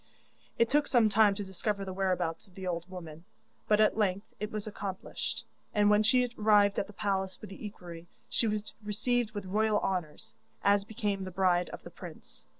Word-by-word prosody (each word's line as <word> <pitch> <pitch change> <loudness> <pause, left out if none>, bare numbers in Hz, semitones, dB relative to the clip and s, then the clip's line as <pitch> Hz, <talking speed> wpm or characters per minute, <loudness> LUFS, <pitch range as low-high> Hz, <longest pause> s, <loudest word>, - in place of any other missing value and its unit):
It 230 - +4
took 290 +4 +2
some 235 -4 +4
time 205 -1 +5
to 205 - -4
discover 195 +1 -2
the 190 - -5
whereabouts 185 -2 -1
of 185 - -22
the 190 - -6
old 175 0 -3
woman, 165 -3 -9 0.4
but 210 - +4
at 215 0 +4
length 200 -1 0
it 210 +1 -3
was 215 -1 -4
accomplished, 200 -3 -5 0.3
and 210 0 +5
when 210 0 +5
she 250 +3 +4
arrived 210 -1 +5
at 195 - -2
the - - -11
palace 190 -2 -1
with 210 - -10
the 195 - -10
equerry, 175 -5 -8 0.2
she 230 - +1
was 210 0 -2
received 220 +2 0
with 205 - -4
royal 210 +2 +2
honours, 155 -12 -3 0.3
as 200 0 +4
became 205 -2 -2
the 185 - -4
bride 180 -1 +2
of - - -9
the - - -10
prince. - - -11
200 Hz, 195 wpm, -31 LUFS, 185-215 Hz, 0.4 s, time